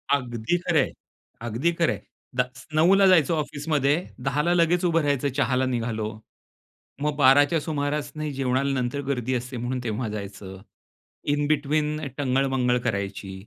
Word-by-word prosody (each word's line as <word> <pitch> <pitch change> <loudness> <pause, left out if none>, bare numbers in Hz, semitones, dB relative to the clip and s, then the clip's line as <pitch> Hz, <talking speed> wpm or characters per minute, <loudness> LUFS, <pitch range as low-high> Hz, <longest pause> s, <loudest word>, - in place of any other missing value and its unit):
अगदी 120 +3 -1
खरं 175 -2 +1
आहे. - - -2 0.5
अगदी 120 +8 0
खरं 165 0 +1
आहे. - - -7 0.4
दस 125 0 -2
9ला 190 +5 +5
जायचो 170 -3 +5
ऑफिसमध्ये, 145 -1 0 0.3
10ला 150 +5 +1
लगेच 175 +1 +3
उभं 165 -1 +3
राहायचं, 145 -1 +1
चहाला 130 -2 +2
निघालो. 115 -4 -2 0.9
मग 150 0 0
12च्या 145 +3 +5
सुमारास 145 -1 -2
नाही, 155 -1 -3
जेवणाला 135 +1 0
नंतर 125 +3 -2
गर्दी 130 -2 -1
असते 125 +1 -4
,म्हणून 120 +2 -2
तेव्हा 115 +1 -2
जायचं. 100 -2 -7 0.7
इन 145 0 0
बेटवीन 150 +1 0 0.2
टंगळ-मंगळ 130 -2 +1
करायची 100 -3 -3
140 Hz, 140 wpm, -25 LUFS, 125-150 Hz, 0.9 s, 9ला